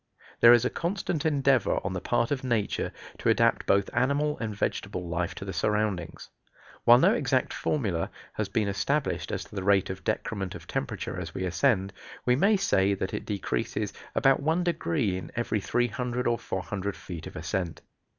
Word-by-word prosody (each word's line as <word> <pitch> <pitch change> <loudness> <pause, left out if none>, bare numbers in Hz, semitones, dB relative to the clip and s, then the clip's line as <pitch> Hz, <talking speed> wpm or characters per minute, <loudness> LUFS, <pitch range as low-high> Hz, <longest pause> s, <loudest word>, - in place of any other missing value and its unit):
There 120 - +9
is 120 0 +6
a - - +1
constant 170 -3 -1
endeavor 140 -4 +2
on 95 - -2
the 90 - -3
part 120 +1 +1
of 135 -2 -1
nature 120 -5 0 0.3
to - - +1
adapt - - +3
both 100 +1 +3
animal 140 +4 +1
and 110 -3 -3
vegetable 95 -3 -2
life 85 +2 -2
to 95 - -7
the 95 - -5
surroundings. 100 -1 -1 0.6
While 120 +1 +9
no - - +5
exact 130 -2 +1
formula 100 - -1 0.2
has 110 -2 -2
been 105 +1 0
established 100 - -1
as - - -2
to - - -16
the 95 - -3
rate 95 -1 +3
of 95 - -8
decrement 100 -3 -2
of - - -9
temperature - - -3
as 80 -2 -7
we 95 - -2
ascend, 95 +2 +1 0.3
we 125 - +4
may 200 +9 +4
say 100 - +2
that 95 0 -3
it - - -4
decreases 95 - -2 0.2
about 135 0 +4
one 160 +5 +1
degree 150 - 0
in - - -9
every 115 -3 -1
300 125 +2 -1
or 120 0 +1
400 95 +1 -3
feet 85 -3 -8
of - - -11
ascent. 85 +1 -3
105 Hz, 180 wpm, -28 LUFS, 95-130 Hz, 0.6 s, There